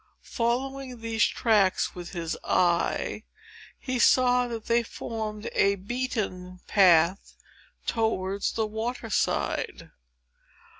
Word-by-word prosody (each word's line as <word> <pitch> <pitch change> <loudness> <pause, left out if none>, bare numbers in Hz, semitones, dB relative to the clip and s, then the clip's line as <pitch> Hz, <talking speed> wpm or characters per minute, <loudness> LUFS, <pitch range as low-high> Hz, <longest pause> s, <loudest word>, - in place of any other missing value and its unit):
Following 255 +1 -2
these 230 0 +1
tracks 210 -5 +2
with 175 -1 -8
his 165 -2 -3
eye, 175 -1 +1 0.6
he 255 -1 -3
saw 250 0 +4
that 230 -2 -6
they 235 0 +3
formed 220 -2 -5
a 200 0 +3
beaten 195 -4 -4
path 180 -1 +4 0.5
towards 200 -4 -1
the 225 - 0
water 225 +2 -4
side. - - -1
220 Hz, 100 wpm, -27 LUFS, 190-240 Hz, 0.6 s, saw